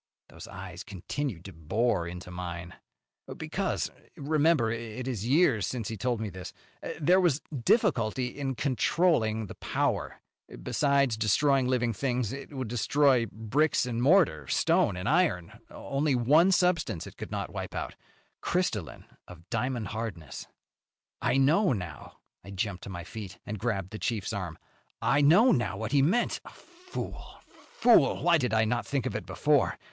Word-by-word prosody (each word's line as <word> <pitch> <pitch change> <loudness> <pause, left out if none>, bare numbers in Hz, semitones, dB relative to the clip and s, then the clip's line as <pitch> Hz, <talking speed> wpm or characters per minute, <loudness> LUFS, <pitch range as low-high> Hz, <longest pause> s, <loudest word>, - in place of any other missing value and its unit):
Those - - -11
eyes 95 0 -8
continued 100 - -5
to 95 - -9
bore 85 +4 0
into 90 +1 -8
mine. 90 -1 -6 0.6
"Because - - -2 0.3
remember 145 -4 +2
it 115 +2 -5
is 115 -4 -3
years 130 - +3
since 120 -5 -4
he 115 - -4
told 120 +3 -1
me 110 -2 -4
this 95 0 -8 0.5
there 180 +5 +4
was 160 -6 +2 0.2
difficulty 130 - +2
in 135 +1 -4
controlling 125 -4 +1
the - - -9
power. - - -2 0.4
Besides 140 -5 +2
destroying 130 +5 +2
living 120 -2 +1
things, 125 0 -1
it 140 +2 -8
would 130 -4 -4
destroy 125 +1 +2
bricks 125 +9 +1
and 120 -1 -2
mortar, 135 - +3
stone 90 - +2
and 90 +3 -4
iron. 90 - +1
Only 140 0 -1
one 150 +10 +4
substance 175 - +1
it - - -11
could - - -7
not - - -4
wipe - - -5
out - - -4 0.5
crystalline 115 - -2 0.2
of 90 -1 -13
diamond 120 -3 -2
hardness. 95 - -6 0.7
"I 130 - +2
know, 155 +7 +4
now!" 90 -8 -7 0.3
I 100 - -12
jumped 100 -1 -3
to - - -7
my 85 -3 -6
feet 100 +1 -8
and 105 0 -5
grabbed 95 -5 -2
the 110 - -7
chief's 110 -3 -2
arm. 95 -6 -4 0.4
"I 145 - +2
know 175 - +6
now 120 -5 0
what 110 +2 -4
he 140 -1 +4
meant. 190 - +1
Fool, 360 +1 -9
fool! 225 - +2
Why 170 -1 +4
did 125 -3 -1
I 110 0 +3
not 120 +2 -1
think 135 -4 -1
of - - -3
it - - -4
before? - - +1
120 Hz, 155 wpm, -28 LUFS, 100-145 Hz, 0.7 s, know